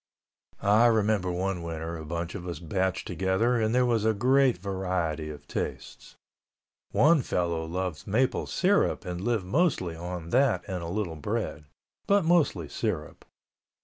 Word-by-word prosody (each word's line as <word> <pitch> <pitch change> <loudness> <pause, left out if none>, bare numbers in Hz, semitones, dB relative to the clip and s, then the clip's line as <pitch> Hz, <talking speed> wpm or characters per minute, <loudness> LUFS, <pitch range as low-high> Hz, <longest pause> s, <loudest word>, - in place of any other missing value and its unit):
I 105 +4 +5
remember 105 -4 +2
one 90 0 -2
winter 80 0 -5
a 80 - -7
bunch 85 +2 -4
of 90 - -6
us 85 -3 -4
batched 95 +3 -1
together 95 +7 +1
and 110 - +2
there 125 0 +4
was 115 -3 +1
a 110 0 +2
great 130 +2 +3
variety 90 -5 -2
of 75 -1 -10
tastes. - - -5 0.8
One 150 +8 +5
fellow 85 -6 -1
loved 90 -1 -4
maple 125 +6 +1
syrup 195 +2 +1
and 90 0 -4
lived 110 -2 0
mostly 110 - +1
on 85 0 -6
that 130 -1 +3
and 95 -3 -3
a 85 - -5
little 90 -3 -3
bread... 75 0 -3 0.4
but 200 -3 +3
mostly 150 - +2
syrup. 90 -2 -4
95 Hz, 150 wpm, -28 LUFS, 85-115 Hz, 0.8 s, I